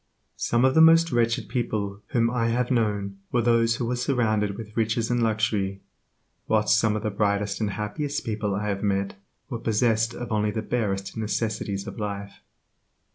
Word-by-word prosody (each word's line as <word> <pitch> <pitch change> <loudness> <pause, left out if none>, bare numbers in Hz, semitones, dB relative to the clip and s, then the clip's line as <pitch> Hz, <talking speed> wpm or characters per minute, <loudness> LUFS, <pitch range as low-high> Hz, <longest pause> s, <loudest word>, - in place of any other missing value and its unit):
Some 120 +2 +2
of 130 - +4
the 160 - +6
most 165 0 +6
wretched 115 -1 +1
people 105 -4 -2
whom 115 -1 +1
I 120 -2 0
have 125 +2 0
known 105 -4 0
were 120 -1 +2
those 115 0 +3
who 120 - -2
were 125 +2 -1
surrounded 110 -5 0
with 110 -1 -9
riches 115 +1 0
and 120 0 +1
luxury, 105 -3 0 0.7
whilst 110 0 +3
some 110 -2 +2
of 110 - -3
the 110 - -1
brightest 100 0 0
and 105 - +1
happiest 140 +9 -3
people 105 -3 -1
I 105 +1 -2
have 100 -1 -2
met 100 -1 0 0.4
were 120 - -3
possessed 115 +1 +1
of 120 -1 -6
only 105 -1 +1
the 110 +1 -3
barest 100 -5 -2
necessities 105 -2 -2
of - - -7
life. 100 -1 -5
110 Hz, 180 wpm, -25 LUFS, 105-120 Hz, 0.7 s, the